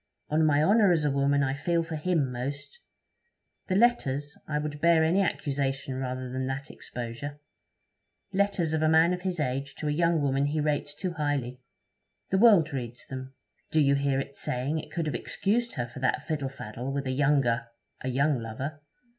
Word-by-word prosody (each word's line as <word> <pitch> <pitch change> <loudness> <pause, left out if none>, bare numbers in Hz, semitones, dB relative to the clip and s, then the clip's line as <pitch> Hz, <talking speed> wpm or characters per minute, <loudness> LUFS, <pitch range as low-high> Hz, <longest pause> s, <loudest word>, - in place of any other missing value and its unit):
On 155 +1 +2
my 150 -1 +4
honour, 205 +2 +5
as 160 -3 +2
a 145 - +2
woman, 140 +1 +2
I 135 0 0
feel 165 +4 0
for 165 -1 -5
him 155 -4 0
most. 140 - -5 0.9
The 185 - 0
letters 150 - +2
I 150 - -1
would 150 -1 -4
bear 170 -1 +5
any 170 +5 +3
accusation 135 -6 -1
rather 130 0 -3
than 130 +1 -3
that 135 +2 -4
exposure. 125 +5 -6 0.9
Letters 190 -5 +1
of 160 - +1
a 155 - +3
man 160 +2 +5
of 180 - -4
his 180 -2 -2
age 135 0 -2
to 155 - -4
a - - +1
young 165 +1 +2
woman 140 -1 +1
he 155 +2 -1
rates 145 -1 -1
too 185 +3 -3
highly! 140 -5 -2 0.7
The 190 - +3
world 195 -9 +6
reads 120 -2 -5
them. 130 0 -7 0.3
Do 160 - +2
you 140 -2 +4
hear 140 -1 +1
it 140 0 -5
saying 135 +6 -2
it - - -9
could 165 0 -2
have 150 - -2
excused 230 - 0
her 120 - -1
for 125 +2 -10
that 130 +3 0
fiddle 145 -4 -2
faddle 125 0 -6
with 140 0 -2
a 130 - -1
younger 130 -4 +2 0.4
a - - -3
young 140 +2 +2
lover? 130 +7 -5
145 Hz, 190 wpm, -28 LUFS, 135-160 Hz, 0.9 s, world